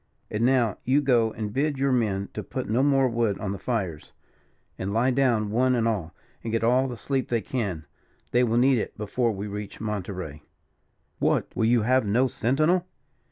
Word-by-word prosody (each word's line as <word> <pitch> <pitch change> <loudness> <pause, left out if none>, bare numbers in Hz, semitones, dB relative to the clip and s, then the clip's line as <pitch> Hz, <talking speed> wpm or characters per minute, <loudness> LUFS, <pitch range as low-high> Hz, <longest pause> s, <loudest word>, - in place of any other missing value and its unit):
And 105 +2 -1
now, 120 -5 +2
you 135 +3 +3
go 120 -6 +2
and 105 -1 -5
bid 145 +2 0
your 135 0 +1
men 100 -6 0
to - - -4
put - - -5
no 115 +4 +1
more 135 -1 +3
wood 115 -4 0
on 100 - -3
the 100 - -5
fires, 95 -11 -3 0.7
and 95 +1 -3
lie 120 +5 +2
down 120 -6 +1
one 125 +3 +2
and 115 -1 +1
all, 95 -8 -2 0.3
and 115 - -4
get 115 0 0
all 125 +3 +3
the 120 -2 -6
sleep 135 +3 -2
they 120 - +1
can. 100 -13 -3 0.5
They 120 +1 +3
will 115 -1 +1
need 130 0 +4
it - - -5
before 110 +3 0
we 100 0 -5
reach 105 0 -6
Monterey." 95 -8 -5 0.8
"What! - - 0
will 110 - +1
you 115 -1 +3
have 130 +3 +3
no 115 +6 +2
sentinel?" 155 +10 +1
115 Hz, 195 wpm, -26 LUFS, 105-130 Hz, 0.8 s, need